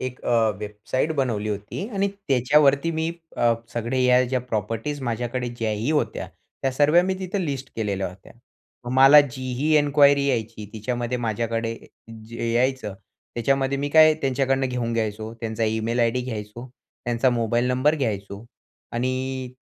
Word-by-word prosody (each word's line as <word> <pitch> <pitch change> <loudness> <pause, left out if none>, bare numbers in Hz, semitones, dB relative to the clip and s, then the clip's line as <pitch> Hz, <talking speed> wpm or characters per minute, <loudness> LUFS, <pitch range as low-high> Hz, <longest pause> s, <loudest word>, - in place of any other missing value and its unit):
एक 130 -1 -5
अ, 115 -2 +3
वेबसाईट 105 +8 -2
बनवली 115 -6 -1
होती 105 - -4
आणि 200 0 +1 0.2
त्याच्यावरती 140 +4 +3
मी 160 0 -1 0.3
अ, 120 -1 +3 0.2
सगळे 120 +2 -2
ह्या, 125 0 +5
ज्या 130 +1 -1
प्रॉपर्टीज 115 +4 -3
माझ्याकडे 120 +1 -2
ज्याही 115 +1 -2
होत्या. 155 -1 -1 0.3
त्या 135 - +1
सर्व्या 150 +6 +4
मी 190 +1 -1
तिथं 190 +1 -3
लिस्ट 140 -6 -4
केलेल्या 100 -3 -1
होत्या. 90 +2 -15 0.6
मला 135 +3 +9
जीही 130 +2 -1
इन्क्वायरी 145 -1 +4
यायची, 115 -4 -2
तिच्यामध्ये 120 +2 -3
माझ्याकडे 115 0 -2
अ, 115 - -18 0.2
जे 115 0 -3
यायचं, 125 -3 0 0.4
त्याच्यामध्ये 135 +3 0
मी 145 +1 -1
काय, 155 0 +7
त्यांच्याकडनं 135 0 +1
घेऊन 120 -2 -2
घ्यायचो. 110 -1 -2
त्यांचा 115 0 -2
ईमेल 110 +2 0
आयडी 120 +2 +2
घ्यायचो, 115 0 -6 0.4
त्यांचा 120 +2 +2
मोबाईल 120 0 0
नंबर 130 +4 +2
घ्यायचो 100 -5 -3 0.5
आणि 130 +1 -2
125 Hz, 145 wpm, -24 LUFS, 115-135 Hz, 0.6 s, मला